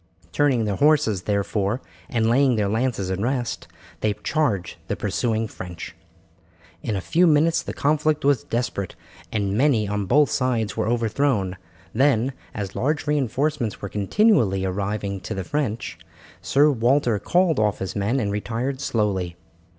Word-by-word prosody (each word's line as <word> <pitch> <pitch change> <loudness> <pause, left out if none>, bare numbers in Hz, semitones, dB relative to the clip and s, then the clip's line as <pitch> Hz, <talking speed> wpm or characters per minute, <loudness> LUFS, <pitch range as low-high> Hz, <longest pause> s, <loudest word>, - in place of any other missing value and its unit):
Turning 135 -6 +2
their 100 -2 -1
horses, 145 -10 +3
therefore, 100 +3 -1 0.3
and 115 -5 +1
laying 130 +2 +4
their 105 -2 +1
lances 110 -3 -1
in 95 +1 -2
rest, 120 0 -2 0.3
they 105 -1 0
charged 110 - 0
the - - -1
pursuing 115 -2 -1
French. 90 -5 -8 0.9
For 110 - -1
a 95 - -2
few 170 - +3
minutes 160 +1 +3
the - - -6
conflict 150 0 +1
was 140 -4 +3
desperate 115 -5 -3 0.4
and 100 -2 -1
many 120 -4 +3
on 105 -1 -2
both 145 +6 +4
sides 120 -5 0
were - - -1
overthrown; 115 -4 0 0.4
then, 130 0 +2 0.2
as 100 -3 -4
large 150 +4 0
reinforcements 145 -3 0
were 100 - -5
continually 105 - +2
arriving 100 +1 -2
to 110 +4 -5
the 95 - -3
French, 125 -2 -3 0.4
Sir 145 +2 +4
Walter 120 -2 +2
called 175 - +2
off 105 -1 +2
his 95 - -5
men 105 +6 0
and 105 -4 -1
retired 120 +6 -3
slowly. 95 -8 -1
115 Hz, 150 wpm, -23 LUFS, 100-140 Hz, 0.9 s, laying